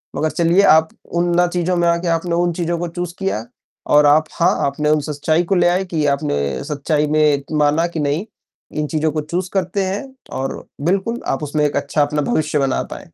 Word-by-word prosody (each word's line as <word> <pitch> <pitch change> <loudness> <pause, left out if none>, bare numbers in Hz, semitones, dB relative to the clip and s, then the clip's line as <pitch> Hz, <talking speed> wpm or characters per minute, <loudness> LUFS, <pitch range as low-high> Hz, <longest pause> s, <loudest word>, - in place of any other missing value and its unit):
मगर 155 - 0
चलिए 170 +4 +3
आप 160 -3 +5 0.3
उन 175 0 +1
ना 175 0 +4
चीज़ों 175 +1 -1
में 175 - +2
आके 170 +1 +1
आपने 170 +1 0
उन 175 0 +1
चीज़ों 170 0 -2
को 175 - -2
चूज़ 175 0 -5
किया 190 - -2 0.5
और 150 0 +6
आप 150 +2 +5
हाँ, 170 - +2
आपने 150 +2 -1
उन 155 0 +3
सच्चाई 155 +3 0
को 190 +3 0
ले 175 -1 +4
आए 185 +2 +1
कि 160 -4 -1
आपने 70 - -1
सच्चाई 150 +1 -1
में 150 -2 +2
माना 150 +3 +2
कि 170 -2 -5
नहीं 150 +6 -1 0.5
इन 150 - -1
चीज़ों 155 +1 0
को 155 +1 -2
चूज़ 175 +4 -3
करते 190 +1 0
हैं 195 +5 -2 0.4
और 135 0 -4 0.2
बिल्कुल 195 +6 0
आप 135 - -1
उसमें 150 0 0
एक 145 - -1
अच्छा 140 +1 0
अपना 150 +1 +1
भविष्य 150 -1 +1
बना 135 -1 +1
पाए। - - -8
160 Hz, 210 wpm, -19 LUFS, 150-175 Hz, 0.5 s, और